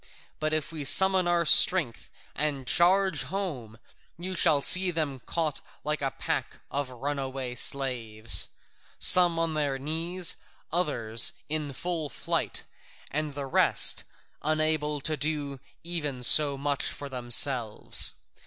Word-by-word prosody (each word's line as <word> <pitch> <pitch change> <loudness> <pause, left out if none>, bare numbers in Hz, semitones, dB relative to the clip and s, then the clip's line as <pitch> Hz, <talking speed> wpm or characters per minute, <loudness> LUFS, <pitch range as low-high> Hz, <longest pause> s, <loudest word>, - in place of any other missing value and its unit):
But 155 0 -3
if 155 +1 -3
we 155 -3 -7
summon 190 +5 +3
our 175 -1 0
strength 155 -7 +6 0.2
and 145 -3 -2
charge 185 +1 +1
home, 140 - -7 0.4
you 185 +2 -7
shall 155 -4 +1
see 185 0 +6
them 155 -6 -4
caught 160 -4 -3 0.2
like 150 0 -4
a 135 - -1
pack - - -5
of 140 -1 -4
runaway 135 0 -6
slaves, 120 -4 +2 0.5
some 175 -2 +6
on 165 -1 -2
their 145 -3 -3
knees, 165 +5 -2 0.4
others 115 -10 +1 0.2
in 150 -2 -3
full 160 +2 -6
flight, - - -4 0.5
and 150 -1 -4
the 140 -1 -6
rest 135 - +2 0.4
unable 155 -1 -2
to 155 +3 -1
do 145 -2 -3 0.2
even 150 -7 -5
so 145 +2 +6
much 140 0 -2
for 145 - -5
themselves. 125 -2 0
150 Hz, 125 wpm, -26 LUFS, 135-165 Hz, 0.5 s, strength